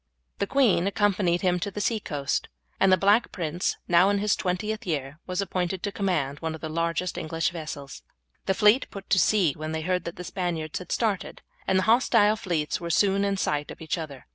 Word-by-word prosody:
The 200 Hz, -, 0 dB
queen 225 Hz, -9 st, +3 dB
accompanied 195 Hz, -3 st, +1 dB
him 180 Hz, -1 st, +2 dB
to 200 Hz, -, -2 dB
the 200 Hz, -, -6 dB
sea 220 Hz, +2 st, 0 dB
coast, 145 Hz, -7 st, -2 dB, 0.3 s
and 195 Hz, -, +4 dB
the 185 Hz, -, +6 dB
Black 205 Hz, +5 st, +3 dB
Prince, 170 Hz, 0 st, -2 dB
now 175 Hz, +2 st, +5 dB
in 205 Hz, -, +2 dB
his 205 Hz, 0 st, +2 dB
twentieth 210 Hz, +5 st, -2 dB
year, 145 Hz, -2 st, -3 dB
was 185 Hz, +2 st, -1 dB
appointed 185 Hz, -1 st, -2 dB
to 205 Hz, -, -1 dB
command 170 Hz, -9 st, -1 dB
one 160 Hz, -1 st, -3 dB
of 160 Hz, -, -12 dB
the 160 Hz, -, -4 dB
largest 165 Hz, +2 st, -1 dB
of -, -, -22 dB
the -, -, -2 dB
English 165 Hz, 0 st, -1 dB
vessels. 150 Hz, -4 st, -7 dB, 0.5 s
The 190 Hz, -, +2 dB
fleet 210 Hz, +7 st, +4 dB
put 195 Hz, -1 st, -10 dB
to 190 Hz, -, +5 dB
sea 185 Hz, -9 st, +3 dB
when 155 Hz, +2 st, -5 dB
they 160 Hz, -, -2 dB
heard 180 Hz, +2 st, -1 dB
that 170 Hz, -, -5 dB
the 180 Hz, -, -7 dB
Spaniards 170 Hz, -4 st, -3 dB
had 180 Hz, -, -10 dB
started, 215 Hz, -5 st, -1 dB, 0.2 s
and 190 Hz, -, +3 dB
the 190 Hz, -, +2 dB
hostile 220 Hz, -2 st, +4 dB
fleets 175 Hz, -7 st, -2 dB
were 170 Hz, -, -4 dB
soon 200 Hz, +3 st, +3 dB
in 200 Hz, -1 st, 0 dB
sight 150 Hz, -5 st, -1 dB
of -, -, -9 dB
each 160 Hz, -, -2 dB
other. 150 Hz, -6 st, -7 dB
180 Hz, 220 wpm, -26 LUFS, 160-200 Hz, 0.5 s, the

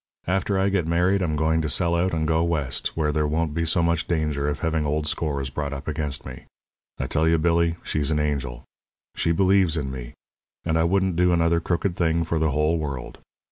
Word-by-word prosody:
After 95 Hz, +2 st, 0 dB
I 95 Hz, +1 st, +2 dB
get 95 Hz, -4 st, 0 dB
married 90 Hz, +4 st, +2 dB
I'm 80 Hz, -4 st, 0 dB
going 80 Hz, +1 st, +1 dB
to 80 Hz, -, -2 dB
sell 85 Hz, +2 st, +1 dB
out 90 Hz, +2 st, +1 dB
and 80 Hz, -1 st, -1 dB
go 80 Hz, +1 st, +2 dB
West, 80 Hz, -7 st, -2 dB
where 75 Hz, -2 st, +1 dB
there 75 Hz, 0 st, 0 dB
won't 80 Hz, 0 st, -1 dB
be 85 Hz, +1 st, -1 dB
so 85 Hz, +1 st, +1 dB
much 85 Hz, -1 st, 0 dB
danger 75 Hz, -4 st, 0 dB
of 75 Hz, -, -4 dB
having 80 Hz, -2 st, 0 dB
old 75 Hz, +1 st, -1 dB
scores 70 Hz, -3 st, -2 dB
brought 70 Hz, +1 st, -3 dB
up 70 Hz, +1 st, -7 dB
against 75 Hz, -3 st, -2 dB
me. -, -, -9 dB, 0.5 s
I -, -, -1 dB
tell 80 Hz, +1 st, +1 dB
you, 80 Hz, 0 st, +4 dB
Billy, 85 Hz, +1 st, +2 dB
she's 75 Hz, -2 st, -1 dB
an 75 Hz, -1 st, +1 dB
angel. 70 Hz, -5 st, -2 dB, 0.5 s
She 85 Hz, -, +1 dB
believes 95 Hz, -2 st, +3 dB
in 70 Hz, -3 st, -2 dB
me; 60 Hz, -2 st, -8 dB, 0.5 s
and 80 Hz, -1 st, 0 dB
I 80 Hz, 0 st, +3 dB
wouldn't 95 Hz, 0 st, +1 dB
do 90 Hz, 0 st, +3 dB
another 85 Hz, 0 st, +3 dB
crooked 85 Hz, +2 st, -1 dB
thing 85 Hz, -1 st, +1 dB
for 85 Hz, 0 st, -1 dB
the 80 Hz, 0 st, +2 dB
whole 75 Hz, +3 st, +1 dB
world. 70 Hz, -5 st, -5 dB
80 Hz, 215 wpm, -24 LUFS, 75-85 Hz, 0.5 s, you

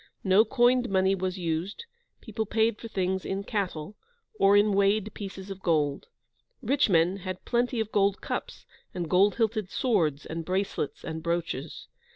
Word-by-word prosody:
No 190 Hz, +2 st, +5 dB
coined 245 Hz, +1 st, +3 dB
money 190 Hz, 0 st, +3 dB
was 185 Hz, 0 st, -2 dB
used; 175 Hz, -, -3 dB, 0.4 s
people 220 Hz, -2 st, -4 dB
paid 220 Hz, 0 st, +1 dB
for 230 Hz, -, -6 dB
things 190 Hz, -3 st, -1 dB
in 195 Hz, +1 st, -3 dB
cattle, 195 Hz, -4 st, -3 dB, 0.4 s
or 200 Hz, +1 st, +6 dB
in 205 Hz, 0 st, +4 dB
weighed 200 Hz, +1 st, +2 dB
pieces 195 Hz, -1 st, -7 dB
of 195 Hz, -1 st, -8 dB
gold. 150 Hz, -5 st, 0 dB, 0.5 s
Rich 270 Hz, 0 st, +1 dB
men 175 Hz, +1 st, +3 dB
had 185 Hz, -1 st, -6 dB
plenty 240 Hz, 0 st, 0 dB
of 220 Hz, -1 st, -2 dB
gold 200 Hz, -1 st, +2 dB
cups, -, -, -5 dB, 0.3 s
and 175 Hz, -2 st, -3 dB
gold 195 Hz, +4 st, +4 dB
hilted 220 Hz, -4 st, 0 dB
swords, 165 Hz, -, 0 dB
and 165 Hz, +1 st, -5 dB
bracelets, 185 Hz, -3 st, -2 dB
and 160 Hz, 0 st, -5 dB
brooches. 170 Hz, -3 st, -3 dB
195 Hz, 160 wpm, -27 LUFS, 175-215 Hz, 0.5 s, or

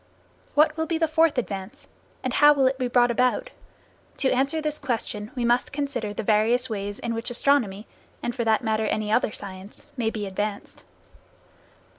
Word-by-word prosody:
What 305 Hz, +1 st, +4 dB
will 320 Hz, 0 st, -1 dB
be 330 Hz, -, 0 dB
the 325 Hz, 0 st, +2 dB
fourth 315 Hz, -1 st, +3 dB
advance, 215 Hz, +3 st, -4 dB, 0.4 s
and 255 Hz, -, -2 dB
how 295 Hz, +1 st, +7 dB
will 275 Hz, -2 st, +2 dB
it 260 Hz, +1 st, +1 dB
be 255 Hz, -, 0 dB
brought 245 Hz, 0 st, +3 dB
about? 255 Hz, -, +1 dB, 0.7 s
To 265 Hz, -, +2 dB
answer 275 Hz, +5 st, +1 dB
this 305 Hz, -1 st, -2 dB
question 215 Hz, -4 st, -3 dB
we 245 Hz, -2 st, -1 dB
must 240 Hz, +1 st, +2 dB
consider 275 Hz, -7 st, -3 dB
the 210 Hz, -, -4 dB
various 225 Hz, +4 st, +2 dB
ways 205 Hz, 0 st, -4 dB
in 235 Hz, -, -3 dB
which 230 Hz, +2 st, -4 dB
astronomy, 240 Hz, -5 st, +1 dB, 0.4 s
and 240 Hz, -, -1 dB
for 240 Hz, -1 st, -2 dB
that 220 Hz, +1 st, +2 dB
matter 220 Hz, -1 st, 0 dB
any 215 Hz, 0 st, -1 dB
other 220 Hz, -1 st, +2 dB
science, 195 Hz, 0 st, -9 dB
may 230 Hz, -3 st, +1 dB
be 215 Hz, -2 st, -4 dB
advanced. 200 Hz, +1 st, -4 dB
240 Hz, 180 wpm, -25 LUFS, 215-275 Hz, 0.7 s, how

